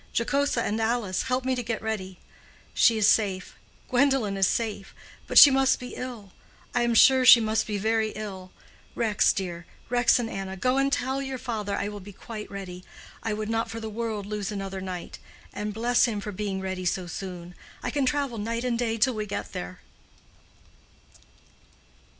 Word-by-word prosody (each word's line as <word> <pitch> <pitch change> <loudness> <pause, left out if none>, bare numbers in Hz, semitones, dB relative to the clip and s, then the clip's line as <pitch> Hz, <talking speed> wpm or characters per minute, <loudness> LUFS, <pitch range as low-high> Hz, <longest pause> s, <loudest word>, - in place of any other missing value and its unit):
Jocosa 280 0 +1
and 220 +2 -1
Alice, 220 -5 0
help 255 0 -1
me 260 - +1
to 250 - -2
get 230 -1 -3
ready. 190 -4 -4 0.6
She 230 -1 +4
is 215 - +3
safe—Gwendolen 220 +4 0
is 195 -1 +3
safe—but 215 -4 -4
she 285 - +11
must 270 0 +3
be 250 - -8
ill. 235 -6 -7 0.4
I 245 - +2
am 240 -1 +1
sure 260 +3 +6
she 250 -1 +10
must 220 0 0
be 210 -2 -2
very 220 +1 +1
ill. 190 -3 -7 0.4
Rex, 225 -3 +3
dear—Rex 195 +7 0
and 240 -2 -2
Anna—go 195 +5 -2
and 275 - +3
and 275 - -1
tell 265 +1 -1
your 265 -1 -4
father 220 -5 -3
I 200 - -2
will 205 0 -6
be 200 +1 -11
quite 215 +2 -8
ready. 185 -2 -8 0.4
I 225 - -2
would 215 0 -3
not 225 +1 -1
for 225 - -5
the 220 -1 -5
world 220 -2 -3
lose 210 0 -4
another 195 -2 -5
night. 185 -2 -6 0.3
And 210 +1 -3
bless 240 +3 +2
him 220 -4 -2
for 210 +1 -5
being 195 -1 -3
ready 190 -1 -4
so 180 0 -1
soon. 180 -1 -7 0.3
I - - -2
can 280 -3 0
travel 275 -5 -1
night 230 +3 -3
and 240 -2 -1
day 230 -2 0
till 250 +3 +3
we 215 -1 -4
get 200 - -5
there." 90 +1 -6
220 Hz, 180 wpm, -26 LUFS, 195-245 Hz, 0.6 s, she